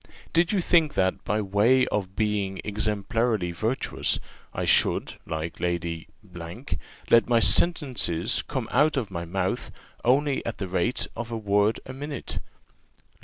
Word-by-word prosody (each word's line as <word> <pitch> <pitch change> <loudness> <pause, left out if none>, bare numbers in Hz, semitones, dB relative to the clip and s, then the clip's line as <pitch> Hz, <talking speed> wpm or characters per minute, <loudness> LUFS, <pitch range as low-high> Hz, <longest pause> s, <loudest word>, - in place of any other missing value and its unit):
Did 170 +1 +3
you 200 -3 +2
think 165 -4 +3
that, 95 0 +1
by 105 +1 0
way 110 +7 +4
of 95 -2 -2
being 105 -3 0
exemplarily 105 -1 0
virtuous, 110 +9 0 0.3
I - - -2
should, - - +2
like 80 +1 -4
Lady 85 -2 -2 0.3
Q, 85 -1 -8 0.5
let 115 +1 +6
my 120 -1 +5
sentences 125 - +2
come 130 -6 -3
out 150 0 +3
of 110 -7 -2
my 85 -2 -4
mouth 95 +2 -2 0.3
only 135 +3 +2
at 115 - -4
the 95 - -3
rate 95 +7 0
of 115 0 -5
a 115 - -2
word 105 0 +2
a 130 - -7
minute? 140 0 -5
110 Hz, 145 wpm, -26 LUFS, 95-130 Hz, 0.5 s, let